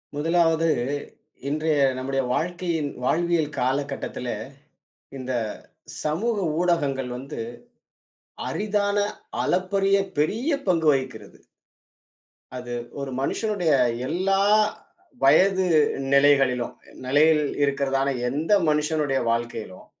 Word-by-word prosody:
முதலாவது 165 +1 +2 0.8
இன்றைய 155 0 0 0.2
நம்முடைய 135 +1 -1
வாழ்க்கையின் 170 -1 -1
வாழ்வியல் 165 +1 +1
காலகட்டத்தில, 135 -1 -2 0.9
இந்தச் 125 -4 -3 0.5
சமூக 205 +10 0 0.2
ஊடகங்கள் 140 -8 0
வந்து 135 -1 -7 1.1
அரிதான 205 -1 0 0.5
அளப்பரிய 195 +2 +2 0.2
பெரிய 215 - 0 0.2
பங்கு 165 -4 +2
வகிக்கிறது. 130 -7 -4 1.2
அது 120 -1 -6 0.3
ஒரு 140 -1 -4
மனுஷனுடைய 195 +2 0 0.4
எல்லா 195 +4 +1 0.8
வயது 185 +7 +5 0.5
நிலைகளிலும் 135 -3 +3 0.3
நிலையில் 150 +3 +4 0.2
இருக்கிறதான 140 -1 +1 0.2
எந்த 150 +8 -2 0.2
மனுஷனுடைய 150 -2 +1
வாழ்க்கையிலும், 115 -4 -4
150 Hz, 80 wpm, -24 LUFS, 135-175 Hz, 1.2 s, வயது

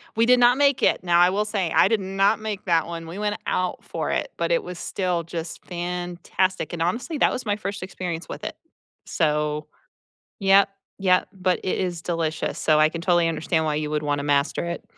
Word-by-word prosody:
We 230 +1 +3
did 250 0 +5
not 245 +2 +5
make 280 -2 +3
it. - - +2
Now, 175 -1 +3
I 180 +1 +6
will 205 +3 0
say, 195 -6 -1
I - - +6
did 225 -2 +2
not 195 +3 +1
make 215 -3 -5
that 165 -2 +2
one. 165 -1 -6
We 175 +5 -7
went 210 0 -1
out 185 0 -1
for - - -4
it, - - -1
but - - -1
it - - +2
was 180 -1 -7
still 180 -3 -1
just 165 0 -6
fantastic. 175 0 -2
And 165 - -4
honestly, 250 - -1
that - - +4
was 250 - -4
my 205 -1 +1
1st 200 -3 -5
experience 180 -3 -5
with - - -7
it, - - -4 0.5
so 150 -2 0 0.7
Yep, 195 +1 +5 0.3
yep, 185 -2 +3
but 185 -1 0
it 185 - -1
is 175 -3 -2
delicious, 165 -2 -2
so 155 -1 +3
I 155 - +6
can 165 +1 -6
totally 175 -2 +3
understand 160 0 0
why 150 - 0
you 150 -1 -2
would 150 0 -1
wanna 145 -1 -1
master 145 +3 +1
it. 170 0 -5
180 Hz, 210 wpm, -24 LUFS, 165-200 Hz, 0.7 s, I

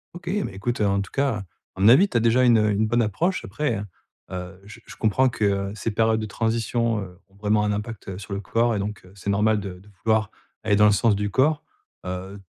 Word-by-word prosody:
OK, 175 0 -11 0.2
mais - - -7
écoute, 120 +5 -3
en 100 -2 +2
tout 100 - -8
cas, 135 -8 0 0.3
à 95 - -6
mon 105 - +7
avis, 170 +12 +7
tu - - -13
as 115 - +4
déjà 120 +2 +3
une 120 -2 +6
une 105 0 +2
bonne 120 +2 +2
approche. 160 - 0
Après 110 -1 -2 0.5
heu, 90 +1 -7
j 105 - -12
je - - -10
comprends 110 +5 +2
que, 115 -3 -4 0.3
heu, - - -8
ces 110 +2 -3
périodes 110 +1 +2
de - - -3
transition, 115 +1 0
heu, 90 -1 -10
ont 95 - -27
vraiment 105 +1 +1
un 105 - +1
impact, 105 +1 -6
heu, 95 - -5
sur 100 +1 -10
le 100 - -2
corps 115 +4 +1
et - - -1
donc 105 0 -5
heu, 90 - -16
c'est 100 0 -5
normal 105 +1 +2
de 95 -2 -7
de 100 +3 -19
vouloir 110 -1 +2 0.3
aller 105 -2 +2
dans 105 - +6
le 105 - +6
sens 110 0 +3
du 105 0 -1
corps. 145 +7 +2 0.4
Heu, 95 +2 -6
105 Hz, 245 wpm, -24 LUFS, 100-115 Hz, 0.5 s, mon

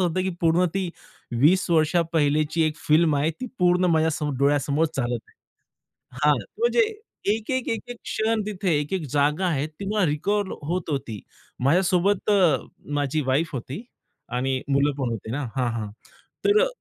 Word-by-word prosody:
होतं, 180 0 +1
की 190 - -1
पूर्ण 170 +2 +3
ती 190 -2 -1 0.5
20 185 +7 +4
वर्ष 160 -1 +3 0.2
पहिलेची 155 +1 +2
एक 155 -1 -2
फिल्म 155 0 +4
आहे 150 +3 +1
ती 255 - -3
पूर्ण 180 0 +3
माझ्या 160 0 +3
समोर 150 -2 -2
डोळ्यासमोर 145 +2 +2
चालत 120 -2 -1
आहे. - - -24 0.9
हां, 150 -1 +5 0.2
म्हणजे 475 0 +3 0.5
एक-एक, 240 +4 -2
एक-एक 235 +2 -4
क्षण 220 0 0
तिथे 200 -3 -2
एक-एक 155 +2 -3
जागा 150 +5 +2
आहे 150 -4 0
ती 155 +5 -10
मला 210 -3 +2
रिकॉल 200 +7 0
होत 165 +2 -2
होती. 115 -7 -3 0.4
माझ्यासोबत 185 +6 +2
अ, 180 -9 +5 0.4
माझी 145 +2 0
वाईफ 145 +5 +1
होती 135 - -5 0.4
आणि 130 +1 -1
मुलं 140 +1 +2
पण 130 -4 -1
होते 110 -1 -5
ना 145 +5 -2
हां, 125 -2 +1
हां 110 -3 -4 0.5
तर 410 +1 +5
अ, - - -2
155 Hz, 160 wpm, -24 LUFS, 145-185 Hz, 0.9 s, हां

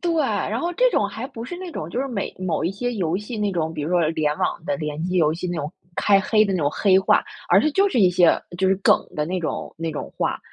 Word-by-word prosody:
对。 345 -1 0
然 - - -1
后 345 +1 -1
这 - - +4
种 205 - +1
还 220 +5 -6
不 230 -3 -8
是 350 +8 -6
那 365 -1 -7
种 155 - -5
就 245 - -2
是 275 - -1
每 220 -6 -3
某 185 -3 -1
一 175 - +1
些 245 +5 -3
游 180 -5 -1
戏 210 +4 -6
那 210 -1 0
种 165 -3 -2
比 150 - -4
如 150 - -3
说 175 -3 +3
联 150 -2 0
网 165 - -2
的 190 0 -1
联 150 -2 -4
机 180 +1 -1
游 155 -3 +3
戏 175 +2 -4
那 175 - -3
种 150 0 -3 0.3
开 200 -1 +4
黑 215 +2 +3
的 200 - -1
那 185 - 0
种 145 -2 +1
黑 190 +1 +3
话。 190 - +3 0.2
而 - - +6
是 305 - +1
就 395 +5 +3
是 250 - -1
一 185 -3 +5
些 175 -1 +4 0.2
就 190 0 +2
是 190 - +4
梗 190 - +4 0.2
的 150 - 0
那 180 +3 -2
种 165 - -4
那 165 0 -3
种 150 - -6
话。 - - -1
185 Hz, 310 characters per minute, -23 LUFS, 165-220 Hz, 0.3 s, 而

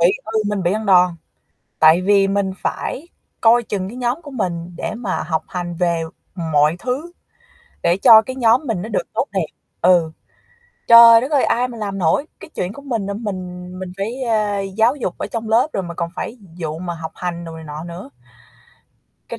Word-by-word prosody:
Bị 175 +3 +5
ừ, 220 0 -1
mình 205 -2 -1
bị 175 +2 +1
ăn 215 0 -3
đòn, 180 -2 +5 0.7
tại 160 +3 +6
vì 195 0 +3
mình 195 -1 0
phải 315 +6 -4 0.3
coi 235 +1 +5
chừng 195 -4 -4
cái 240 - -9
nhóm 250 +6 -2
của 290 - -10
mình 175 -8 -4
để - - -4
mà 220 -5 -3
học 160 -2 -2
hành 175 -1 -5
về 170 -1 0 0.3
mọi 160 -3 +1
thứ, 270 - -4 0.7
để 170 +1 +3
cho 220 +2 +8
cái 260 +4 -7
nhóm 235 0 +3
mình 215 -6 -1
nó 215 - -6
được - - -2
tốt - - 0
đẹp. - - 0 0.4
Ừ. 170 -3 +4 0.8
Trời 230 0 +9
đất 265 +5 -4
ơi, 285 -3 +3
ai 245 +2 +1
mà 240 - -9
làm 200 -3 -4
nổi. 180 - +1
Cái - - -11
chuyện 180 +2 -3
của 280 - -11
mình 235 -8 -3
mà 200 - -3
mình 185 -4 -6
mình 185 -1 -6
phải, 225 +7 -4
ờ, 210 -4 0
giáo 220 +6 +1
dục 210 -11 -4
ở - - -4
trong 225 -1 -5
lớp 235 +6 +4
rồi 195 - -2
mà 170 - -6
còn 170 0 -3
phải 240 - -5 0.2
vụ 160 -1 -4
mà 175 -1 -4
học 160 -1 -7
hành 175 -1 -4
đồ 165 -1 -8
này 160 - -10
nọ 150 0 -7
nữa. 170 -1 -9 1.2
Cái - - -6
195 Hz, 205 wpm, -19 LUFS, 175-230 Hz, 1.2 s, Trời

